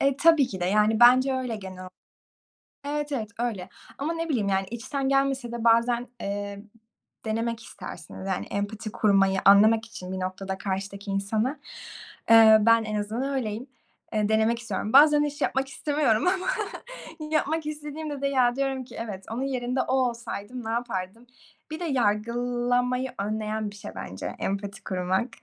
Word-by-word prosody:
E - - +3
e, 275 - +2
tabii 320 -2 +5
ki 190 -7 -7
de. 175 - 0
Yani, 210 +3 +2
bence 255 +2 +6
öyle 250 -4 -3
genel 185 -2 -8 1.0
Evet, 295 0 -3
evet, 220 -6 -3
öyle. 210 -7 -2 0.3
Ama, 300 +4 -1
ne 330 0 -3
bileyim, 220 -9 0
yani, 195 0 +1
içten 265 +4 -3
gelmese 275 -3 +1
de 235 -1 -4
bazen, 235 +1 +3
eee, 200 0 -4 0.6
denemek 230 +1 -2
istersiniz, 190 - -9
yani 190 -1 -2
empati. 210 +2 -4
kurmayı 195 -2 +3
anlamak 215 +3 +6
için 185 -4 -8
bir 190 - -4
noktada 190 +1 -4
karşıdaki 200 +1 -4
insana. 215 +8 -1 0.7
Eee, 220 -1 +9
ben 230 +1 +4
en 215 - -4
azından 225 +7 -2
öyleyim. 230 -1 -3 0.5
Eee, 210 -1 +1
denemek 220 +2 +2
istiyorum. 225 -2 -4
Bazen 295 +1 +7
hiç 290 -1 -4
yapmak 270 +1 0
istemiyorum 285 -5 +1
ama 370 0 +1 0.8
yapmak 315 0 0
istediğimde 300 -1 -5
de, - - +2
ya, 255 -2 +2
diyorum 270 -1 -1
ki, - - -13
"Evet, 200 -4 -6
onun 235 +3 -3
yerinde 255 -1 -1
o - - -3
olsaydım 240 -2 -2
ne 225 - -4
yapardım?" 230 -1 -4 0.4
Bir 315 - -5
de 350 - -3
yargılamayı 245 +1 0
önleyen 215 +1 -2
bir 205 - -13
şey 205 - -8
bence 95 0 -6
empati 200 +1 -4
kurmak, 185 +5 -1
230 Hz, 160 wpm, -26 LUFS, 205-265 Hz, 1.0 s, Eee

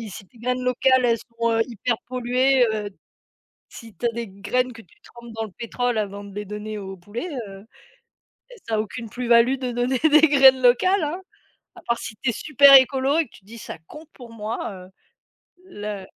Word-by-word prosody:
si 225 -2 -8
si 195 +1 -10
tes 235 - -23
graines 250 +2 -2
locales, 255 +1 +2
elles 230 -1 +2
sont, 230 +1 -3
heu, 225 0 +2
hyper 235 0 -2
polluées, 255 +1 +2
heu, 210 -1 -4 0.8
si 230 -3 -13
tu 210 - -5
as - - +3
des 235 0 -5
graines 205 +6 -2
que 225 - -12
tu 180 - -25
trempes 235 -1 -14
dans 225 0 -4
le 215 - -12
pétrole 245 0 -2
avant 205 -1 -4
de 200 -1 -12
les 210 0 -5
donner 210 +1 -6
au 195 -1 -7
poulet, 205 - -7 0.2
heu 195 +1 -12 0.9
et - - -12
ça 225 - -1
a - - 0
aucune 220 +1 -5
plus-value 240 +2 +3
de 255 -2 -4
donner 245 +2 -1
des 310 +1 +5
graines 270 -3 +6
locales 320 +10 +3
hein, 315 +5 -3 0.5
à - - -13
part 235 0 +1
si 220 - -8
tu 260 - 0
es - - -1
super 280 +2 +6
écolo 265 +2 +4
et - - +3
que 235 - -25
tu 190 - -24
dis: 230 +3 -12
«Ça 215 - -8
compte 305 +1 -13
pour 245 -3 -13
moi», 225 +1 -5
heu, 185 -1 -12 0.8
le 205 - -7
235 Hz, 210 wpm, -23 LUFS, 215-255 Hz, 0.9 s, graines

